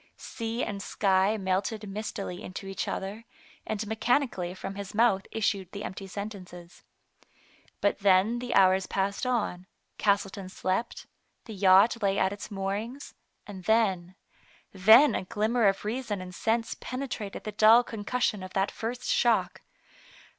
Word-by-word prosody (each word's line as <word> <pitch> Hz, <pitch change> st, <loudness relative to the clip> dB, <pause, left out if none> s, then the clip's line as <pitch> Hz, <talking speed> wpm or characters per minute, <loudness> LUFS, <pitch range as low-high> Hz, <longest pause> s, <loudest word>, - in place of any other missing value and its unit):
Sea 230 Hz, +2 st, -4 dB
and 200 Hz, -1 st, -4 dB
sky 195 Hz, +1 st, +1 dB
melted 200 Hz, +3 st, -2 dB
mist 210 Hz, +2 st, -5 dB
ily 180 Hz, -3 st, -5 dB
into 185 Hz, +2 st, -7 dB
each 195 Hz, 0 st, -4 dB
other, 200 Hz, +4 st, -4 dB, 0.4 s
and 215 Hz, 0 st, -2 dB
mechanically 220 Hz, -4 st, 0 dB
from 195 Hz, -, -6 dB
his 200 Hz, +1 st, -7 dB
mouth 215 Hz, -4 st, +3 dB
issued 200 Hz, -4 st, -1 dB
the 200 Hz, -, -6 dB
empty 195 Hz, +1 st, -6 dB
sentences. 185 Hz, -4 st, -8 dB, 1.0 s
But 200 Hz, -, +1 dB
then 200 Hz, +4 st, +3 dB
the 245 Hz, 0 st, -3 dB
hours 190 Hz, 0 st, +4 dB
passed 200 Hz, +5 st, -1 dB
on, 205 Hz, -7 st, -1 dB, 0.3 s
Castleton 200 Hz, -2 st, 0 dB
slept, 185 Hz, +4 st, -3 dB, 0.4 s
the 225 Hz, -, -8 dB
yacht 200 Hz, +4 st, +5 dB
lay 195 Hz, -1 st, +1 dB
at 190 Hz, -, +1 dB
its 205 Hz, -, -8 dB
moorings, 205 Hz, +7 st, -4 dB, 0.3 s
and 190 Hz, -3 st, -10 dB
then 190 Hz, -5 st, +1 dB, 0.3 s
— -, -, -31 dB, 0.2 s
then 245 Hz, +3 st, +9 dB
a -, -, -2 dB
glimmer 225 Hz, +2 st, +1 dB
of 195 Hz, +1 st, 0 dB
reason 225 Hz, -2 st, -3 dB
and 180 Hz, 0 st, -8 dB
sense 225 Hz, +4 st, -1 dB
penetrated 255 Hz, -6 st, -5 dB
the 215 Hz, -, -5 dB
dull 220 Hz, +3 st, +6 dB
concussion 220 Hz, -1 st, -2 dB
of 185 Hz, 0 st, -9 dB
that 195 Hz, 0 st, 0 dB
first 240 Hz, +3 st, -5 dB
shock. 235 Hz, -2 st, +1 dB
205 Hz, 145 wpm, -28 LUFS, 190-225 Hz, 1.0 s, then